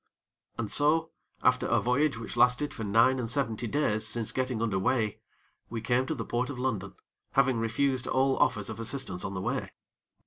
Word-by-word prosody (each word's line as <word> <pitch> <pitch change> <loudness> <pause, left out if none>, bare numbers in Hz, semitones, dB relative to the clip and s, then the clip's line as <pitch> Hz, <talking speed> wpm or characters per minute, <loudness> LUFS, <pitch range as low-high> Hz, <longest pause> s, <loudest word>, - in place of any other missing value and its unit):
And 110 -3 -3
so, 160 +3 +3 0.3
after - - +3
a - - +3
voyage 130 +1 +1
which 115 0 -6
lasted 125 +4 +3
for 115 - -6
nine 115 +6 +4
and 115 -2 -3
seventy 120 -3 -1
days 110 -5 0
since 110 0 -1
getting 130 -3 -1
under 110 -4 0
weigh, 115 -1 0 0.5
we 115 - -4
came 120 +3 +1
to 160 - -1
the 115 - -4
Port 120 +2 -1
of 140 - -5
London, 105 -7 -2 0.4
having 130 -3 +3
refused 130 +3 0
all 135 +1 +2
offers 105 +1 +1
of 110 - -8
assistance 115 -6 -3
on 100 0 -4
the 95 - -3
way. - - -2
120 Hz, 185 wpm, -29 LUFS, 110-130 Hz, 0.5 s, nine